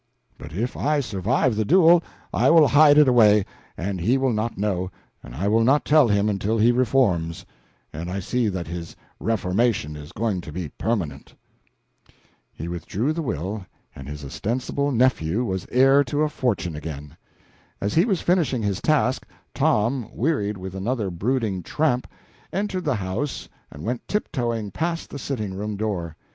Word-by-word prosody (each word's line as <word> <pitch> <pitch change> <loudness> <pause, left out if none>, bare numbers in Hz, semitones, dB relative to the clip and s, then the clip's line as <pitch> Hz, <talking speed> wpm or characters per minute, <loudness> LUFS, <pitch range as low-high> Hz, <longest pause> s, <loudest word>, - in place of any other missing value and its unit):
But 75 - -11
if 110 +10 -3
I 150 +1 +1
survive 115 +1 0
the 110 - +1
duel, 170 - +6 0.3
I - - +3
will 160 -2 +7
hide 145 0 +6
it 150 -2 +7
away, 105 -5 +5 0.3
and 95 0 -3
he 120 +10 +3
will 130 -2 +1
not 110 +2 -2
know, 95 -3 -1 0.3
and - - -11
I 95 +8 -1
will 110 +2 +3
not 135 +5 +3
tell 150 -3 +5
him 105 -1 +2
until 105 +2 0
he 115 +2 +5
reforms, 115 -10 +1 0.5
and 85 +3 -5
I 95 +2 -3
see 120 +5 0
that 95 -4 -3
his 85 0 -7 0.2
reformation 100 -5 0
is 75 0 -10
going 105 -4 -1
to 80 - -9
be 85 -1 -5
permanent." 80 - -3 1.2
He 80 - -7
re 85 0 -4
drew 115 - -1
the 165 - -3
will, 100 - -3 0.3
and 65 0 -9
his 75 -1 -7
ostensible 125 - -2
nephew 120 -5 +1
was 95 -4 -3
heir 135 +3 +5
to 145 +4 0
a 155 - +1
fortune 100 - -1
again. 75 -1 -7 0.6
As 100 - -2
he 165 - +5
was 195 -7 0
finishing 160 -10 +1
his 100 -2 -1
task, 145 -4 +1 0.3
Tom, 115 +2 +1
wearied 110 -8 -1
with 95 0 -7
another 100 +1 -2
brooding 105 +1 -1
tramp, 125 - 0 0.4
entered 190 -2 -2
the 145 -4 +1
house 100 +8 -3 0.2
and 70 - -11
went 120 +4 -3
tiptoeing 120 - -2
past 165 - -3
the 140 - -6
sitting 110 -8 -3
room 105 +2 -4
door. 95 -7 -3
110 Hz, 170 wpm, -23 LUFS, 95-135 Hz, 1.2 s, will